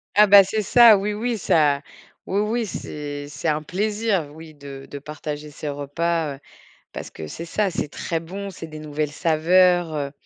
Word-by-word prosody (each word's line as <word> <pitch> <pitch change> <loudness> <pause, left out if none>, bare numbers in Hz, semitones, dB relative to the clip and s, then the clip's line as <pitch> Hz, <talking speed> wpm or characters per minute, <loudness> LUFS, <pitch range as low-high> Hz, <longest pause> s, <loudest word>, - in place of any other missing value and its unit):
Ah 210 +1 +7
bah, 200 0 +9
c'est 215 +3 -2
ça, 230 +1 +7
oui, 205 +2 -2
oui, 230 +2 -2
ça 150 -7 +2 0.5
oui, 195 - 0
oui, 225 +2 -1
c'est 145 -5 -6
c'est 145 +3 -5
un 155 0 0
plaisir, 205 -1 -1
oui, 160 0 -12
de 140 -2 -10
de 145 - -6
partager 150 0 -7
ses 150 +1 -6
repas, 145 +2 -2
heu, - - -17 0.5
parce - - -7
que 80 - -8
c'est 165 - -7
ça, 200 +4 0
c'est 170 - -3
très 165 +3 -3
bon 195 +4 -7
c'est 175 -3 -9
des 155 -1 -9
nouvelles 150 -1 -3
saveurs, 175 +2 +3
heu, 145 -2 -3
165 Hz, 185 wpm, -22 LUFS, 145-195 Hz, 0.5 s, bah